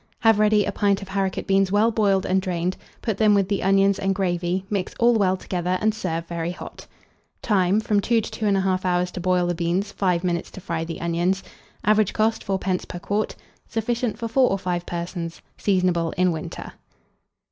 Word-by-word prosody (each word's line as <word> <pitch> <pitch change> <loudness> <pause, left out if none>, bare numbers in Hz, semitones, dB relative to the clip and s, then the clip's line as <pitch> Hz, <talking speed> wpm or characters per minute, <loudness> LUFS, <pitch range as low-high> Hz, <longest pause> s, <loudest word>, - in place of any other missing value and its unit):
Have 225 -3 +5
ready 215 -1 +4
a - - -1
pint 200 -1 +1
of 195 - -11
haricot 195 -1 -1
beans 195 -1 +2
well 215 +3 +3
boiled 200 -4 +2
and 190 +1 +2
drained; 180 -1 -1 0.3
put 220 -4 -2
them 215 -2 +5
with 195 -2 +2
the 200 - 0
onions 195 +1 +3
and 195 0 0
gravy, 180 0 -1
mix 200 -3 -3
all 240 +1 +5
well 190 -4 +2
together, 180 0 -2
and 215 0 +2
serve 165 -6 -3
very 170 0 -3
hot. 180 - -9 0.6
Time. 195 -2 +3
From 210 -1 +1
2 230 +3 +2
to 220 - -5
2 215 - -2
1/2 190 -2 +1
hours 180 -1 +1
to 180 - -6
boil 180 0 +2
the 175 - 0
beans; 175 +4 -1
5 180 -3 0
minutes 175 -2 -1
to - - -10
fry 170 -2 -3
the 165 0 -6
onions. 175 +3 0 0.4
Average 215 -1 +3
cost, 220 +1 +1
4d. 190 -1 -1
per - - -6
quart. 205 +4 -2 0.3
Sufficient 230 0 -1
for 230 - -3
4 250 +2 +3
or 195 - +1
5 175 -2 -3
persons. 170 -1 -5 0.2
Seasonable 180 -4 +1
in 180 0 +3
winter. 160 -2 -6
190 Hz, 195 wpm, -23 LUFS, 175-210 Hz, 0.6 s, Have